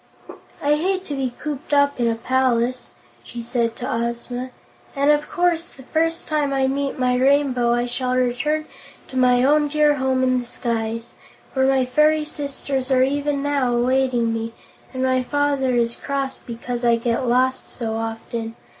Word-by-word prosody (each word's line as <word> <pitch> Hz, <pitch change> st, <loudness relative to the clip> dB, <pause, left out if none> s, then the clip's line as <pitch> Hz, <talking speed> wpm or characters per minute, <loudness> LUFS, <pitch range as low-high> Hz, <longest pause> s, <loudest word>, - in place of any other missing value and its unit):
"I 295 Hz, +1 st, +3 dB
hate 375 Hz, +3 st, -1 dB
to 290 Hz, -, -5 dB
be 265 Hz, -3 st, -1 dB
cooped 295 Hz, -1 st, -3 dB
up 285 Hz, -1 st, +3 dB
in 240 Hz, -, +2 dB
a 230 Hz, -, +1 dB
palace," 255 Hz, 0 st, 0 dB, 0.3 s
she 240 Hz, -1 st, -7 dB
said 230 Hz, -1 st, -1 dB
to 245 Hz, -, -5 dB
Ozma, 235 Hz, +2 st, -3 dB, 0.5 s
"and 280 Hz, +1 st, +4 dB
of 295 Hz, 0 st, +1 dB
course 350 Hz, -1 st, +1 dB
the 265 Hz, -, -14 dB
first 330 Hz, +4 st, -1 dB
time 300 Hz, -2 st, 0 dB
I 270 Hz, -1 st, +2 dB
meet 275 Hz, +1 st, -1 dB
my 250 Hz, -1 st, +2 dB
Rainbow 260 Hz, -2 st, +3 dB
I 240 Hz, 0 st, +1 dB
shall 250 Hz, +1 st, -2 dB
return 255 Hz, +5 st, 0 dB, 0.4 s
to -, -, -10 dB
my 250 Hz, -1 st, +4 dB
own 295 Hz, +2 st, +4 dB
dear 295 Hz, 0 st, +3 dB
home 260 Hz, -1 st, +1 dB
in 255 Hz, -1 st, +2 dB
the 245 Hz, -, -7 dB
skies, 230 Hz, -1 st, -3 dB, 0.4 s
where 265 Hz, -1 st, +2 dB
my 265 Hz, -1 st, +3 dB
fairy 300 Hz, +4 st, +3 dB
sisters 280 Hz, -3 st, -3 dB
are 260 Hz, -1 st, +4 dB
even 285 Hz, +1 st, 0 dB
now 275 Hz, -4 st, +1 dB
awaiting 245 Hz, -1 st, +2 dB
me 225 Hz, 0 st, -3 dB, 0.4 s
and 260 Hz, -1 st, -3 dB
my 255 Hz, 0 st, +2 dB
father 280 Hz, -1 st, 0 dB
is 235 Hz, -1 st, +1 dB
cross 275 Hz, -1 st, -3 dB
because 240 Hz, +1 st, -5 dB
I 235 Hz, -1 st, +4 dB
get 235 Hz, +2 st, -1 dB
lost 255 Hz, +2 st, +1 dB
so 225 Hz, -2 st, -4 dB
often. 225 Hz, 0 st, -4 dB
260 Hz, 170 wpm, -22 LUFS, 240-285 Hz, 0.5 s, and